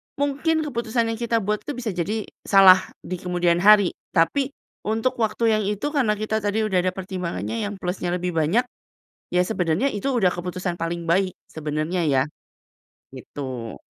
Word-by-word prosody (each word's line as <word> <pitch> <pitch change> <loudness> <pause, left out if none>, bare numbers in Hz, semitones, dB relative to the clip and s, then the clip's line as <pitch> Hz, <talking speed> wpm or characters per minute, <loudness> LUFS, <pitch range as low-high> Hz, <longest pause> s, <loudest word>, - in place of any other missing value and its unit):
mungkin 290 +3 0
keputusan 235 -4 -1
yang 225 - -5
kita 230 -2 0
buat 210 +2 0
itu 290 - -5
bisa 235 -3 -3
jadi 200 +5 -2 0.2
salah 195 -2 +8 0.2
di 185 -1 -5
kemudian 175 -1 +1
hari, 205 0 +6 0.2
tapi 270 - +2 0.3
untuk 225 +4 0
waktu 220 +1 0 0.2
yang - - -1
itu 210 +8 -2
karena 255 -8 +2
kita 215 +1 -1
tadi 210 +1 0
udah 195 -4 +1
ada 185 0 0
pertimbangannya 190 +3 -3
yang 205 - -5
plusnya 180 -1 -2
lebih 180 0 -2
banyak, 165 +8 +2 0.7
ya 180 - +2
sebenarnya 180 - 0
itu 205 +6 -2
udah 210 -9 +2
keputusan 180 0 -4
paling 170 0 -3
baik 185 +2 +1
sebenarnya 155 +3 -3
ya, 135 -2 +3 0.9
gitu. 130 -5 -7
195 Hz, 160 wpm, -23 LUFS, 175-225 Hz, 0.9 s, salah